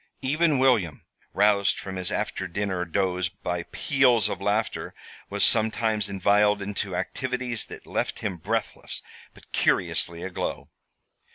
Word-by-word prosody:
Even 155 Hz, +2 st, +2 dB
William, 120 Hz, -, +2 dB, 0.3 s
roused 100 Hz, -1 st, +3 dB
from 95 Hz, -1 st, -6 dB
his 90 Hz, -1 st, 0 dB
after -, -, -2 dB
dinner 95 Hz, -1 st, -2 dB
doze 90 Hz, 0 st, 0 dB
by 90 Hz, 0 st, -4 dB
peals 125 Hz, -7 st, +3 dB
of -, -, -4 dB
laughter, 105 Hz, +1 st, -1 dB, 0.3 s
was -, -, +2 dB
sometimes 110 Hz, -2 st, +2 dB
inveigled 105 Hz, +2 st, +3 dB
into 100 Hz, -1 st, -3 dB
activities 125 Hz, 0 st, -2 dB
that -, -, -10 dB
left -, -, -2 dB
him 95 Hz, -4 st, -3 dB
breathless, 105 Hz, +6 st, -3 dB, 0.3 s
but -, -, -19 dB
curiously 85 Hz, 0 st, +1 dB
aglow. 95 Hz, -1 st, -4 dB
105 Hz, 125 wpm, -26 LUFS, 95-115 Hz, 0.3 s, roused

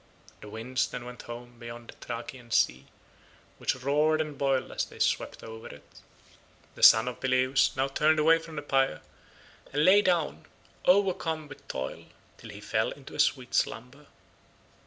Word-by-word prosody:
The 105 Hz, -, -10 dB
winds 125 Hz, +5 st, -2 dB
then 120 Hz, -, -7 dB
went 125 Hz, -1 st, -9 dB
home 120 Hz, 0 st, -10 dB
beyond 120 Hz, 0 st, -9 dB
the -, -, -8 dB
Thracian 120 Hz, +1 st, -7 dB
sea, 65 Hz, -, +1 dB, 0.7 s
which -, -, 0 dB
roared 150 Hz, +4 st, +1 dB
and 155 Hz, -2 st, -3 dB
boiled 135 Hz, -1 st, 0 dB
as -, -, -1 dB
they -, -, -10 dB
swept -, -, -1 dB
over 110 Hz, 0 st, -9 dB
it. 70 Hz, 0 st, -12 dB, 0.9 s
The -, -, -13 dB
son 110 Hz, +2 st, +8 dB
of 125 Hz, -, -5 dB
Peleus 130 Hz, +1 st, +2 dB
now 135 Hz, +1 st, +2 dB
turned 155 Hz, +3 st, +2 dB
away 160 Hz, +2 st, +5 dB
from 165 Hz, -1 st, -11 dB
the 145 Hz, -, -5 dB
pyre 135 Hz, -, +1 dB, 0.7 s
and 145 Hz, +2 st, +1 dB
lay 200 Hz, +2 st, +7 dB
down, 170 Hz, -, 0 dB, 0.4 s
overcome 180 Hz, -5 st, +2 dB
with 135 Hz, -, -13 dB
toil, 65 Hz, 0 st, -5 dB, 0.3 s
till 115 Hz, -, -11 dB
he 105 Hz, 0 st, -10 dB
fell 110 Hz, +1 st, 0 dB
into 140 Hz, -1 st, -11 dB
a -, -, -8 dB
sweet 125 Hz, -3 st, +1 dB
slumber. 135 Hz, +5 st, -2 dB
130 Hz, 165 wpm, -28 LUFS, 115-150 Hz, 0.9 s, son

